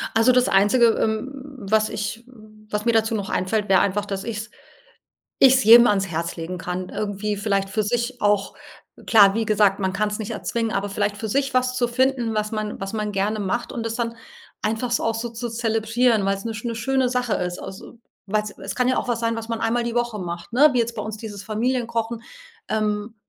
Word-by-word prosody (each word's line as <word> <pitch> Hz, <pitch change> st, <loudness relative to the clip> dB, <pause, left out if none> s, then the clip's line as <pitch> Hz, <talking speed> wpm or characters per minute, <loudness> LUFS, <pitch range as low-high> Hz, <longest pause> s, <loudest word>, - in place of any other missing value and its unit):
Also, 225 Hz, +3 st, +5 dB
das 250 Hz, 0 st, +3 dB
Einzige, 210 Hz, +5 st, +4 dB
ähm, 220 Hz, +4 st, -1 dB, 0.3 s
was 215 Hz, 0 st, +1 dB
ich 215 Hz, +3 st, -4 dB, 0.5 s
was 210 Hz, +1 st, -2 dB
mir 235 Hz, -, +3 dB
dazu 225 Hz, 0 st, +2 dB
noch 200 Hz, -2 st, -3 dB
einfällt, 210 Hz, +3 st, -1 dB
wäre 190 Hz, -1 st, +5 dB
einfach, 200 Hz, +1 st, 0 dB
dass 195 Hz, -1 st, -4 dB
ich 230 Hz, -2 st, -4 dB
es 220 Hz, +2 st, -6 dB, 0.9 s
ich 265 Hz, -1 st, +8 dB
es 260 Hz, -, +2 dB
jedem 235 Hz, +2 st, +9 dB
ans 195 Hz, -3 st, +2 dB
Herz 170 Hz, 0 st, -3 dB
legen 175 Hz, +2 st, -5 dB
kann, 180 Hz, +1 st, -4 dB
irgendwie 205 Hz, 0 st, -3 dB
vielleicht 200 Hz, -2 st, 0 dB
für 215 Hz, -, 0 dB
sich 240 Hz, +3 st, -2 dB
auch 205 Hz, -1 st, +1 dB, 0.5 s
klar, 205 Hz, -3 st, +7 dB
wie 225 Hz, -1 st, -1 dB
gesagt, 205 Hz, -2 st, +3 dB
man 190 Hz, -1 st, -1 dB
kann's 210 Hz, +1 st, -1 dB
nicht 220 Hz, +1 st, -4 dB
erzwingen, 230 Hz, 0 st, -2 dB
aber 200 Hz, 0 st, -2 dB
vielleicht 205 Hz, 0 st, -1 dB
für 220 Hz, +1 st, -5 dB
sich 270 Hz, +3 st, 0 dB
was 255 Hz, 0 st, +1 dB
zu 245 Hz, -1 st, +1 dB
finden, 245 Hz, -2 st, +1 dB
was 215 Hz, +1 st, -1 dB
man 215 Hz, -1 st, -3 dB
was 195 Hz, +1 st, -4 dB
man 210 Hz, -1 st, -2 dB
gerne 205 Hz, +2 st, -1 dB
macht 235 Hz, +5 st, -2 dB
und 230 Hz, -2 st, -4 dB
das 225 Hz, -, -3 dB
dann 230 Hz, -1 st, -3 dB, 0.5 s
einfach 225 Hz, +3 st, -1 dB
so 240 Hz, -, +1 dB
auch 225 Hz, -, 0 dB
so 230 Hz, +1 st, -4 dB
zu 235 Hz, +1 st, -5 dB
zelebrieren, 225 Hz, 0 st, +1 dB
weil 195 Hz, -, +1 dB
es 195 Hz, -, -10 dB
'ne 230 Hz, -, -3 dB
'ne 230 Hz, +1 st, -4 dB
schöne 260 Hz, +3 st, +1 dB
Sache 250 Hz, -2 st, -1 dB
ist, 180 Hz, 0 st, -3 dB
also, 195 Hz, +5 st, -10 dB, 0.3 s
weil 210 Hz, +2 st, +1 dB
es 210 Hz, -, -7 dB
es 195 Hz, 0 st, -5 dB
kann 250 Hz, 0 st, +1 dB
ja 255 Hz, -, +2 dB
auch -, -, -3 dB
was 235 Hz, -1 st, 0 dB
sein, 230 Hz, 0 st, 0 dB
was 225 Hz, 0 st, -6 dB
man 230 Hz, -1 st, -3 dB
einmal 230 Hz, +1 st, +1 dB
die 235 Hz, -, -3 dB
Woche 240 Hz, -2 st, -1 dB
macht, 175 Hz, +2 st, -6 dB
ne, 285 Hz, +6 st, +6 dB
wie 250 Hz, -, +1 dB
jetzt 235 Hz, 0 st, 0 dB
bei -, -, -4 dB
uns 215 Hz, 0 st, -5 dB
dieses 210 Hz, -2 st, -8 dB
Familienkochen, 230 Hz, +1 st, -2 dB, 0.5 s
ähm. 215 Hz, 0 st, -1 dB
220 Hz, 225 wpm, -23 LUFS, 205-235 Hz, 0.9 s, jedem